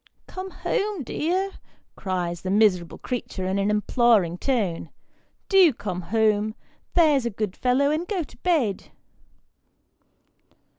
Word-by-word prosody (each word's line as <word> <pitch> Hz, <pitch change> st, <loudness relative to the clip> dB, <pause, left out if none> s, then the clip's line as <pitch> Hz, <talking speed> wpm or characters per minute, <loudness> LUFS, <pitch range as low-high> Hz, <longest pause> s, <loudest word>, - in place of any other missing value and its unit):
" -, -, -45 dB
Come 375 Hz, +1 st, -7 dB
home, 410 Hz, -, -2 dB
dear," 365 Hz, +9 st, -1 dB, 0.4 s
cries 180 Hz, -3 st, -3 dB
the 185 Hz, -, -4 dB
miserable 190 Hz, -4 st, +2 dB
creature, 235 Hz, -6 st, -4 dB
in 190 Hz, +1 st, 0 dB
an 200 Hz, +1 st, +1 dB
imploring 210 Hz, -4 st, +2 dB
tone; 200 Hz, -, -1 dB, 0.3 s
" -, -, -43 dB
do 360 Hz, -5 st, +8 dB
come 190 Hz, -5 st, -5 dB
home, 215 Hz, +3 st, +1 dB, 0.4 s
there's 300 Hz, -8 st, +4 dB
a -, -, 0 dB
good 210 Hz, -3 st, -4 dB
fellow, 265 Hz, +3 st, +2 dB
and 320 Hz, +3 st, -1 dB
go 380 Hz, -5 st, -1 dB
to -, -, -16 dB
bed." 285 Hz, -, 0 dB
220 Hz, 135 wpm, -24 LUFS, 190-305 Hz, 0.4 s, do